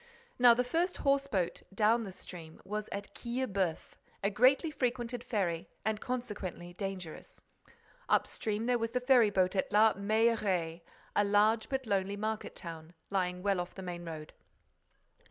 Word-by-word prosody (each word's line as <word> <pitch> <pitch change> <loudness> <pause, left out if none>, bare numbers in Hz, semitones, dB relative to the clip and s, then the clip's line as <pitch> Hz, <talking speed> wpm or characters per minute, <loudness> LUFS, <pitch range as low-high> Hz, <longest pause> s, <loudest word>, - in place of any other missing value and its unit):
Now 245 -1 +8
the 250 - +2
first 335 +8 0
horse 275 0 +3
boat 185 -7 -1
down 220 +3 +3
the 195 - -6
stream 165 -3 -10
was 210 +1 -4
at 200 0 -5
Quillebeuf, 205 -9 -2 0.3
a 200 - +2
greatly 260 - +4
frequented 245 -3 -2
ferry 175 -7 -1 0.2
and, 215 -1 0
consequently, 205 -8 -4
dangerous. 185 -3 -6 0.7
Up - - +4
stream, 215 +1 -3
there 245 0 +2
was 230 0 -1
the 250 +2 0
ferry 250 -3 +5
boat 185 -1 +2
at 190 - 0
La 215 +1 +6
Mailleraie, 200 -5 +1 0.3
a 205 - +4
large, 210 +2 +3
but 265 -1 -2
lonely 200 -1 0
market 215 +1 -3
town, 165 -1 -8 0.2
lying 180 -2 -1
well 200 -2 +2
off 175 0 -5
the 190 - -7
main 175 -1 -5
road. 160 -2 -7
205 Hz, 155 wpm, -32 LUFS, 185-235 Hz, 0.7 s, Now